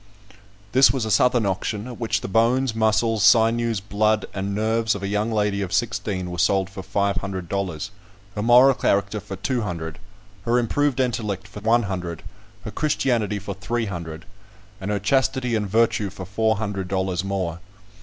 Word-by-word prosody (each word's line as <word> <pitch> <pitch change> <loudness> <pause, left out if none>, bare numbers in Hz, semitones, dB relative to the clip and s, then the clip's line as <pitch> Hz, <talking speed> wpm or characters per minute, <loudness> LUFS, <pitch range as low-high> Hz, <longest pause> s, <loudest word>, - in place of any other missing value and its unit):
This 130 +4 +6
was 130 -5 -1
a 110 - -2
Southern 120 +2 +3
auction, 100 +2 -2
at 125 -2 -8
which 115 -2 0
the - - -4
bones, 115 +5 +2
muscles, 110 -1 +2
sinews, 115 0 +4
blood, 105 +2 +1
and 100 +1 -3
nerves 110 +1 +1
of 100 - -6
a - - -1
young 105 +3 -1
lady 105 -2 0
of 95 -3 -3
sixteen 95 -3 -1
were 90 - -5
sold 95 +1 +2
for 95 -1 -7
five 100 0 0
hundred 95 -1 -4
dollars; 95 -2 -3 0.4
her 105 - -3
moral 125 +4 +6
character 100 -2 0
for 95 0 -7
two 120 +6 -1
hundred; 85 -5 -5 0.5
her 120 +1 +2
improved 135 +3 +1
intellect 110 -6 -1
for - - -9
one 115 +3 +3
hundred; 90 -4 -4 0.4
her - - -6
Christianity 120 -8 0
for 100 0 -5
three 110 +5 -2
hundred; 85 -5 -6 0.6
and 95 - -4
her 105 - +1
chastity 125 +3 +1
and 105 -2 -1
virtue 110 -1 +2
for 95 +1 -8
four 110 +4 +1
hundred 100 -3 -3
dollars 95 -1 -1
more. 95 -4 -2
105 Hz, 175 wpm, -23 LUFS, 95-115 Hz, 0.6 s, This